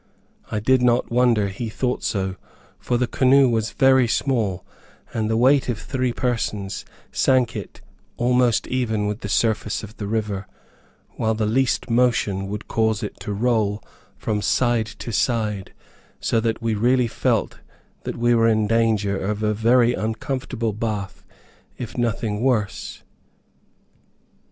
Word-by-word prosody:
I 110 - 0
did 130 +4 +3
not 120 -1 +2
wonder 120 -4 +3
he 110 +4 -5
thought 125 +3 -2
so, 95 -3 -1 0.4
for 120 - 0
the 125 - +1
canoe 135 +2 +4
was 115 -2 0
very 130 -2 +4
small, 110 -7 0 0.5
and 110 -1 -1
the 110 - +1
weight 130 +3 +4
of 120 - -1
three 130 +1 -2
persons 115 -6 -2 0.3
sank 130 -3 +2
it - - -7 0.4
almost 125 -1 +2
even 110 -5 -1
with 105 +1 -2
the 105 - -6
surface 110 +1 0
of 110 +1 -10
the 100 - -4
river, 105 -3 -2 0.7
while 110 0 +1
the 110 0 0
least 125 +4 +1
motion 115 -5 +1
would 105 +2 -6
cause 110 0 0
it 105 - -6
to - - -5
roll 105 -1 0 0.3
from 105 -1 -2
side 120 -1 +1
to 115 - -7
side, 105 -3 0 0.5
so 115 - +1
that 115 0 -2
we 115 -1 +1
really 120 +3 +2
felt - - -1 0.4
that - - -5
we 120 +1 +3
were 115 -1 +4
in 110 -1 +3
danger 110 -3 +1
of 105 +2 -2
a 105 0 +2
very 120 +3 +3
uncomfortable 115 0 -3
bath 105 -2 -4 0.5
if 120 - -7
nothing 115 -3 -1
worse. 120 -6 -1
115 Hz, 145 wpm, -22 LUFS, 105-125 Hz, 0.7 s, canoe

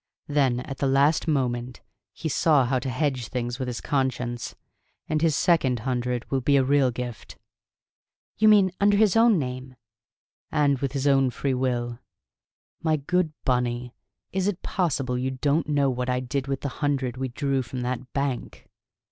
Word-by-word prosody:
Then, 135 -4 +1
at 135 0 -7
the 140 - +1
last 140 +5 +3
moment, 125 -4 -1 0.3
he - - -5
saw 150 -2 +3
how 130 +1 +1
to 130 +1 -4
hedge 130 -2 -1
things 120 0 -3
with 130 - -3
his 120 -2 -4
conscience. 125 -3 -2 0.5
And 155 -1 0
his 160 -3 +3
second 140 - +2
hundred 125 -1 -2
will 135 -1 +1
be 140 +3 +3
a 135 - +4
real 140 0 +3
gift." 120 -2 -7 1.0
"You 215 - +3
mean 205 -3 +6
under 205 0 +4
his 215 -1 +4
own 225 -2 +5
name 130 -2 -5 0.4
" - - -78 0.3
"And 145 -3 +2
with 135 -1 -2
his 140 -1 -2
own 135 -2 +4
free 135 +2 -2
will. 120 -2 -1 0.8
My 160 -1 +2
good 165 +3 0
Bunny, 125 -1 0 0.4
is 190 0 0
it 200 -3 -2
possible 135 -9 -1
you 130 +1 -1
don't 145 +4 0
know 140 -2 +2
what 125 0 -3
I 125 0 +1
did 130 +2 -3
with 135 -1 -2
the 140 - -2
hundred 135 -4 0
we 130 +1 -3
drew 135 +2 -1
from 125 +1 -6
that 125 0 -4
bank!" 140 -3 -3
135 Hz, 175 wpm, -25 LUFS, 125-145 Hz, 1.0 s, mean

